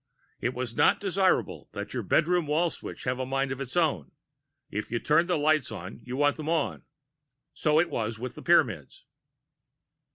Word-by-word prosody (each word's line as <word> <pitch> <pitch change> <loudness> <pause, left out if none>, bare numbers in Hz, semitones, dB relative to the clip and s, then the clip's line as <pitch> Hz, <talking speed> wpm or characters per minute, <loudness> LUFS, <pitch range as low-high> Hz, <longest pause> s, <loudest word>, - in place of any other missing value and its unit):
It 125 +1 -2
is 125 -2 -3
not - - +4
desirable 190 -1 0
that - - -6
your - - -1
bedroom 170 0 +2
wall 160 +3 +2
switch - - -8
have 125 0 -1
a 130 - -1
mind 135 0 0
of 135 +1 -4
its 135 +3 -5
own; 140 - +1 0.6
if 105 - -3
you 120 - -1
turn 155 +7 +3
the 180 -2 +1
lights 155 -2 +2
on, 95 +4 -7
you 125 +1 -5
want 145 0 +3
them 155 0 -4
on. 165 -3 0 0.7
So 155 0 +2
it 170 +1 +1
was 110 -1 -2
with 125 +2 -5
the - - -10
Pyramids. - - +1
145 Hz, 185 wpm, -28 LUFS, 125-165 Hz, 0.7 s, not